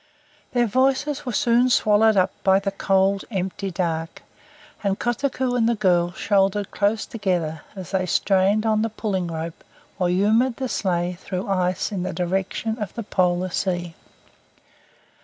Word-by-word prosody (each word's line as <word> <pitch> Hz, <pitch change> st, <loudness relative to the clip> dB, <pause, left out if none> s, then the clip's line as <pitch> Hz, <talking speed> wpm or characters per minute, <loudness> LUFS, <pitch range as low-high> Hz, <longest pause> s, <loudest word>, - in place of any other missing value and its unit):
Their 240 Hz, -1 st, +3 dB
voices 270 Hz, +5 st, 0 dB
were -, -, -1 dB
soon 240 Hz, +1 st, +3 dB
swallowed 215 Hz, -2 st, +4 dB
up 185 Hz, 0 st, +3 dB
by 190 Hz, 0 st, +5 dB
the 195 Hz, 0 st, -2 dB
cold, 195 Hz, 0 st, +1 dB
empty 195 Hz, -1 st, -3 dB
dark, 165 Hz, -3 st, -3 dB, 0.6 s
and 200 Hz, -1 st, 0 dB
Kotuko 250 Hz, +1 st, -1 dB
and 230 Hz, -2 st, +2 dB
the 235 Hz, -, +2 dB
girl 175 Hz, -4 st, +2 dB
shouldered 200 Hz, 0 st, +1 dB
close 210 Hz, +2 st, 0 dB
together 175 Hz, -8 st, -2 dB
as 190 Hz, -3 st, -8 dB
they 185 Hz, -2 st, 0 dB
strained 195 Hz, +4 st, +2 dB
on 215 Hz, -1 st, +2 dB
the 225 Hz, -, 0 dB
pulling 200 Hz, -5 st, -2 dB
rope 165 Hz, 0 st, -6 dB, 0.4 s
or 180 Hz, -1 st, +2 dB
humoured 220 Hz, +7 st, +2 dB
the 260 Hz, -1 st, -4 dB
sleigh 180 Hz, -3 st, -1 dB
through 185 Hz, -1 st, -4 dB
the -, -, -8 dB
ice 185 Hz, 0 st, 0 dB
in 195 Hz, -3 st, -3 dB
the 185 Hz, -, -3 dB
direction 190 Hz, +5 st, -2 dB
of 210 Hz, -4 st, -5 dB
the 230 Hz, -, -4 dB
Polar 185 Hz, -2 st, +1 dB
Sea. 175 Hz, -2 st, -2 dB
195 Hz, 160 wpm, -23 LUFS, 180-225 Hz, 0.6 s, by